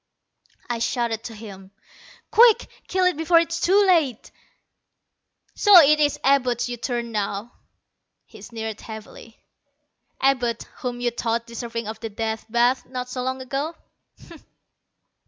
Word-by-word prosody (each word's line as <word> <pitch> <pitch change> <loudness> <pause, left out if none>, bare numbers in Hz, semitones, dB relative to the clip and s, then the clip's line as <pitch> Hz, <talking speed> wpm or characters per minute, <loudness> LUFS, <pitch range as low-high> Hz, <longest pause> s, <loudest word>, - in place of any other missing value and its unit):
I 240 -1 -3
shouted 230 -1 -1
to 225 - -7
him. 195 -3 -11 0.6
"Quick, 460 -1 +6 0.2
kill 370 0 +1
it 365 - +2
before 325 +2 +3
it's 335 0 -2
too 400 +3 +4
late!" 310 - +1 1.2
"So 415 -2 +5
it 305 -1 +5
is 290 -1 +1
Abud 255 -4 +2
you 245 - -4
turn 240 0 -3
to 235 - -10
now," 210 +1 -3 0.7
he - - -15
sneered 220 -2 -6
heavily. 220 +1 -11 0.8
"Abud, 250 -3 +1
whom 245 -1 -5
you 240 -1 0
thought 235 0 -2
deserving 235 -1 -6
of 220 0 -6
the 225 - -5
Death 220 +1 -4
Bath 240 +3 +2
not 250 0 -6
so 250 0 -4
long 260 +1 -3
ago. 280 +6 -3
245 Hz, 140 wpm, -23 LUFS, 225-280 Hz, 1.2 s, Quick